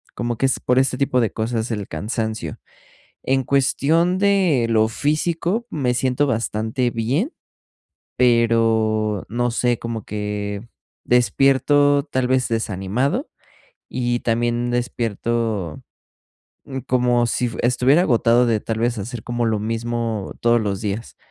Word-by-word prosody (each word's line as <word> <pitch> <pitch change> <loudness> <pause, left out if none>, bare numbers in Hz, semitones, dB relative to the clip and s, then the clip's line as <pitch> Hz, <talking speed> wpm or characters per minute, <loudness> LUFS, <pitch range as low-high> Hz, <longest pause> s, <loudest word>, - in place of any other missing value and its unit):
como 120 -1 -2
que - - +1
es 135 - 0
por 125 +1 +2
este 130 -1 +1
tipo 130 -2 +1
de 115 -4 0
cosas 115 +1 -2
el 105 -3 -4
cansancio. 110 - -3 0.7
En 135 0 +1
cuestión 160 +7 +2
de 190 -11 +3
lo 110 -1 +3
físico, 170 - -1
me 130 -5 0
siento 130 +3 +1
bastante 115 +1 -1
bien, 135 - -1 0.8
pero 115 -3 +2
no 120 +2 0
sé, 120 0 0
como 115 -2 -5
que 105 +1 -4 0.3
despierto 135 +3 +3
tal 130 -4 -1
vez 130 -1 +2
desanimado, 115 - -1 0.6
y 120 -1 -1
también 120 +1 0
despierto, 115 -6 -2 0.8
mm, 135 -1 -5
como 125 -2 +2
si 125 +1 0
f 115 - -5
estuviera 125 +6 +3
agotado, 120 -4 +3
de 115 -2 +1
tal 110 +1 -3
vez 120 +1 0
hacer 110 +2 -6
como 120 -1 -2
lo 110 -1 +1
mismo 115 -1 -3
todos 120 0 +3
los 100 -3 -2
días. 105 +2 -4
120 Hz, 130 wpm, -21 LUFS, 110-130 Hz, 0.8 s, de